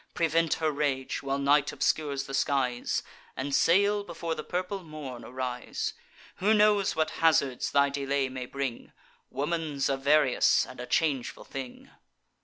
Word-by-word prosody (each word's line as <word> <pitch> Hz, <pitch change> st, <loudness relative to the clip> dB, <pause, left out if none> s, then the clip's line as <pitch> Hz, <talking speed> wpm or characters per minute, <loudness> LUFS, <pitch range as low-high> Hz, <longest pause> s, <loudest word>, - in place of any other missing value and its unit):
Prevent 165 Hz, -1 st, +2 dB
her 160 Hz, -1 st, 0 dB
rage, 140 Hz, -3 st, -1 dB
while 135 Hz, 0 st, -1 dB
night 140 Hz, +1 st, +3 dB
obscures 140 Hz, -3 st, 0 dB
the 135 Hz, -, -9 dB
skies, 130 Hz, -3 st, 0 dB, 0.3 s
And 140 Hz, +1 st, -3 dB
sail 200 Hz, +7 st, +3 dB
before 170 Hz, -3 st, -4 dB
the 155 Hz, -, -5 dB
purple 185 Hz, +2 st, -3 dB
morn 150 Hz, -6 st, -8 dB
arise. 125 Hz, -1 st, -4 dB, 0.4 s
Who 210 Hz, +4 st, +3 dB
knows 210 Hz, -2 st, +3 dB
what 155 Hz, 0 st, 0 dB
hazards 140 Hz, -6 st, +3 dB
thy 140 Hz, 0 st, +3 dB
delay 140 Hz, -1 st, -1 dB
may 130 Hz, -1 st, -6 dB
bring? 135 Hz, -3 st, -5 dB, 0.4 s
Woman's 150 Hz, -2 st, -1 dB
a 135 Hz, -, +1 dB
various 140 Hz, -1 st, +3 dB
and 130 Hz, -, -12 dB
a 125 Hz, -, -6 dB
changeful 140 Hz, -6 st, 0 dB
thing." 130 Hz, -2 st, -8 dB
140 Hz, 145 wpm, -28 LUFS, 135-165 Hz, 0.4 s, night